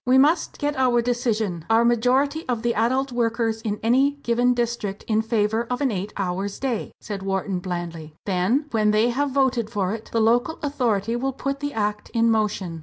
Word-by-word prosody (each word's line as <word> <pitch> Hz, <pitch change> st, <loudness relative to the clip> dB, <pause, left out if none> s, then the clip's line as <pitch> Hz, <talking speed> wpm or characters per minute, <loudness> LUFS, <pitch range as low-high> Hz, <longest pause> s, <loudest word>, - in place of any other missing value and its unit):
"We 255 Hz, +1 st, +4 dB
must 295 Hz, +6 st, +3 dB
get 290 Hz, 0 st, -1 dB
our 250 Hz, -2 st, +3 dB
decision, 225 Hz, -8 st, -1 dB
our 225 Hz, +1 st, +4 dB
majority 260 Hz, +6 st, +2 dB
of 240 Hz, -2 st, -1 dB
the 240 Hz, 0 st, +1 dB
adult 260 Hz, +5 st, +1 dB
workers 230 Hz, -2 st, 0 dB
in 210 Hz, -2 st, -3 dB
any 265 Hz, +5 st, +3 dB
given 245 Hz, +1 st, +2 dB
district 235 Hz, -4 st, -2 dB
in 220 Hz, -1 st, +2 dB
favour 220 Hz, +1 st, 0 dB
of 250 Hz, -, -1 dB
an 275 Hz, -4 st, +1 dB
eight 200 Hz, +1 st, -3 dB
hours 195 Hz, +1 st, -2 dB
day," 255 Hz, -5 st, -2 dB
said 200 Hz, -2 st, -6 dB
Wharton, 195 Hz, -1 st, -2 dB
blandly; 170 Hz, -4 st, -5 dB
"then 200 Hz, +10 st, +1 dB
when 215 Hz, -2 st, +2 dB
they 215 Hz, +3 st, +3 dB
have 280 Hz, +4 st, 0 dB
voted 260 Hz, -5 st, +1 dB
for 200 Hz, -3 st, -1 dB
it, 225 Hz, 0 st, -7 dB
the 230 Hz, -, +1 dB
local 245 Hz, +8 st, +2 dB
authority 235 Hz, -6 st, 0 dB
will 265 Hz, +3 st, -1 dB
put 275 Hz, +1 st, -3 dB
the 285 Hz, 0 st, -3 dB
Act 210 Hz, -1 st, -2 dB
in 230 Hz, 0 st, +4 dB
motion." 205 Hz, -6 st, -1 dB
230 Hz, 190 wpm, -23 LUFS, 210-250 Hz, -, We